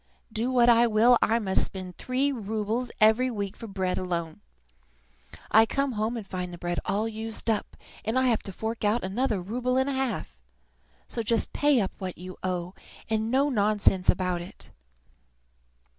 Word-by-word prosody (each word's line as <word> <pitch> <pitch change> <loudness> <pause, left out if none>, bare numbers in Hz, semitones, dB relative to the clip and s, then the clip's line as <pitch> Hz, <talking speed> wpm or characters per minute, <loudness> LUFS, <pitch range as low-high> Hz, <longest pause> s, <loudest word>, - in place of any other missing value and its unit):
Do 230 +3 -1
what 245 -2 +4
I 235 0 +6
will, 230 +3 +5
I 225 - +3
must 195 -4 +3
spend 185 -2 -4
three 265 +3 0
roubles 220 +1 -2
every 220 +4 +4
week 200 -4 -4
for 230 - -9
bread 190 -2 -2
alone. 170 - -4 1.1
I 225 +1 +6
come 275 +2 0
home 220 +1 -2
and 220 - -6
find 180 -2 -5
the 175 - -8
bread 175 0 -3
all 210 +3 0
used 225 +1 -2
up, 215 - -3 0.3
and 220 +4 -1
I 260 - +3
have 240 -4 +2
to 195 - -4
fork 220 +4 -4
out 210 +3 +2
another 215 +3 0
rouble 245 +7 -1
and 265 +1 +2
a 280 - -1
half. 240 - -2 0.7
So 230 - -3
just 230 0 0
pay 290 -3 +3
up 195 -3 -1
what 185 -2 -5
you 185 +1 -8
owe, 180 -1 -3 0.4
and 220 0 0
no 275 +4 +2
nonsense 205 -4 +2
about 180 -1 +1
it!" 175 - -13
220 Hz, 175 wpm, -27 LUFS, 190-240 Hz, 1.1 s, I